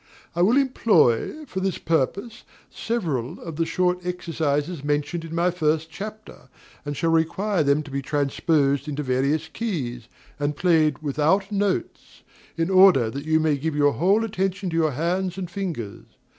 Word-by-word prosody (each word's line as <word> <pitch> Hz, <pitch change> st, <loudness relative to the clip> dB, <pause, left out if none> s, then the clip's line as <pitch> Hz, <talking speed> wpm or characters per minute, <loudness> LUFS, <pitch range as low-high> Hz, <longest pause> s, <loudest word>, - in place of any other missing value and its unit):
I 175 Hz, -, +1 dB
will 220 Hz, +9 st, +4 dB
employ, 235 Hz, -, +2 dB
for 220 Hz, -8 st, -5 dB
this 190 Hz, -1 st, -1 dB
purpose, 195 Hz, -, -1 dB, 0.3 s
several 160 Hz, -, -3 dB
of 165 Hz, -3 st, -8 dB
the 165 Hz, 0 st, 0 dB
short 180 Hz, 0 st, 0 dB
exercises 165 Hz, -3 st, -2 dB
mentioned 150 Hz, +3 st, -1 dB
in 165 Hz, 0 st, -7 dB
my 175 Hz, +1 st, +2 dB
first 160 Hz, -1 st, 0 dB
chapter, 210 Hz, -7 st, -9 dB, 0.3 s
and 145 Hz, -1 st, -5 dB
shall 165 Hz, -, +1 dB
require 170 Hz, +4 st, +1 dB
them 145 Hz, +1 st, +2 dB
to 145 Hz, -, -11 dB
be 140 Hz, 0 st, -2 dB
transposed 140 Hz, 0 st, 0 dB
into 150 Hz, 0 st, -3 dB
various 140 Hz, +5 st, 0 dB
keys, 135 Hz, -, -4 dB, 0.3 s
and 145 Hz, 0 st, -1 dB
played 155 Hz, -4 st, +2 dB
without 155 Hz, +8 st, +1 dB
notes, 200 Hz, -, -2 dB, 0.3 s
in 165 Hz, +3 st, 0 dB
order 185 Hz, -12 st, +6 dB
that 140 Hz, +3 st, -6 dB
you 160 Hz, 0 st, +3 dB
may 155 Hz, -2 st, +1 dB
give 155 Hz, +2 st, -3 dB
your 145 Hz, -1 st, +3 dB
whole 195 Hz, +7 st, +2 dB
attention 195 Hz, -3 st, -2 dB
to -, -, -3 dB
your 160 Hz, -3 st, +2 dB
hands 175 Hz, +5 st, -1 dB
and 180 Hz, -2 st, -5 dB
fingers. 165 Hz, -, -5 dB
165 Hz, 160 wpm, -24 LUFS, 145-190 Hz, 0.3 s, order